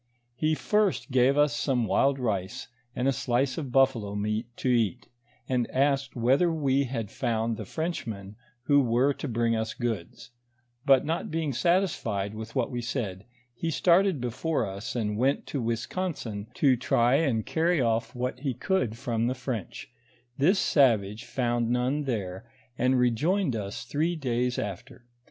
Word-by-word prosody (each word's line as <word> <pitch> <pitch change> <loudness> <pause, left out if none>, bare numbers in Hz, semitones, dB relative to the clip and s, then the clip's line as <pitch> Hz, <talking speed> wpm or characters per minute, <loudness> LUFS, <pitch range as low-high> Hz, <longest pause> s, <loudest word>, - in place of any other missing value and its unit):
He 155 +5 +1
first 210 -5 0
gave 130 +2 +4
us 145 0 +3
some 125 -6 0
wild 135 +5 +2
rice, 110 0 -3 0.3
and 125 - 0
a - - +4
slice 130 +3 0
of 140 -5 -5
buffalo 120 -6 +2
meat 105 +3 -1
to - - -3
eat, 120 -1 +1 0.4
and 125 -2 0
asked 135 0 +1
whether 130 +9 +3
we 140 -3 +1
had 115 -5 -4
found 115 0 -1
the - - -6
Frenchmen 110 - -4 0.3
who 145 +1 +4
were 125 +3 +2
to 145 - -6
bring 115 -1 +1
us 110 0 -2
goods; 115 -2 -4 0.6
but 135 0 +5
not 160 +2 -2
being 155 -3 -1
satisfied 120 - 0
with 110 +2 -8
what 130 -1 0
we 120 -1 -3
said, 110 -6 -4 0.3
he 165 +7 -3
started 175 +2 +3
before 125 +7 -1
us, 100 +7 -6
and 105 -3 -1
went 135 +3 +1
to 140 - -3
Ouisconsin 115 - -3
to 135 -3 +4
try 120 0 +2
and 130 -9 +1
carry 165 +1 +1
off 115 -1 0
what 125 +1 -3
he 135 -3 -2
could 160 - -1
from 120 -3 -1
the 130 - -1
French; 120 -7 -5 0.4
this 170 +10 +3
savage 115 - +2
found 120 -2 0
none 125 +4 0
there, 105 -3 -4 0.3
and 125 +1 +2
rejoined 130 - +1
us 100 -2 -4
three 155 +8 0
days 125 -4 -1
after. 105 +4 -6
125 Hz, 160 wpm, -27 LUFS, 115-140 Hz, 0.6 s, but